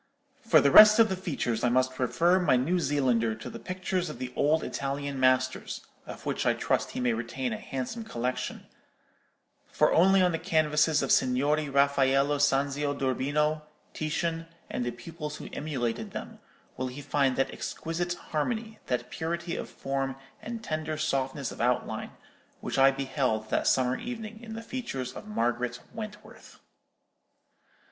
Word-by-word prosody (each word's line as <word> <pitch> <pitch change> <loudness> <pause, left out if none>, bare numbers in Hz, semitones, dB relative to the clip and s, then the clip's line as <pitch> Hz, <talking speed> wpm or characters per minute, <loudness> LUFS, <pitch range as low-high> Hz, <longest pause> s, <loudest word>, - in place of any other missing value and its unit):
For 165 -9 +5
the 140 - +4
rest 215 +4 +10
of 225 -1 +6
the 190 - 0
features 140 -11 -2
I 125 - +4
must 130 +1 +1
refer 170 +9 +3
my 175 -8 +3
New 165 +9 +1
Zealander 125 -7 +1
to 110 - -8
the - - -8
pictures 185 0 -2
of - - -7
the 125 0 -6
old 155 +3 +2
Italian 140 0 -3
masters—of 130 0 -1
which - - -1
I - - +3
trust - - 0
he - - -1
may 125 -2 +2
retain 120 +2 -3
a - - -5
handsome 135 - -5
collection;—for 125 - -4
only 190 +2 +5
on 180 - +3
the 165 - -2
canvases 155 -3 +2
of 135 - 0
Signori 145 +4 +2
Raffaello 140 0 +3
Sanzio 140 +1 +1
d'Urbino, 145 +4 0 0.3
Titian, 165 +1 -2 0.2
and - - -2
the 120 - -1
pupils 150 +5 -7
who - - -8
emulated 130 -6 -3
them, - - -7 0.4
will 130 - -2
he 130 +3 -7
find 140 -2 +1
that 135 - 0
exquisite 175 +2 -3 0.2
harmony, 220 +8 -2
that 125 -1 -2
purity 170 +1 -3
of - - -5
form 135 -1 -3 0.3
and 230 0 -6
tender 155 -3 -3
softness 135 -2 -1
of - - -7
outline, 125 +1 0 0.5
which - - -3
I 135 0 +8
beheld 135 -5 -1
that - - +1
summer 130 -1 +3
evening 225 -2 -6
in 220 -1 -8
the 225 - -6
features 135 - -4
of 210 - -9
Margaret 125 - -1
Wentworth. 215 -2 -10
140 Hz, 155 wpm, -28 LUFS, 130-170 Hz, 0.5 s, rest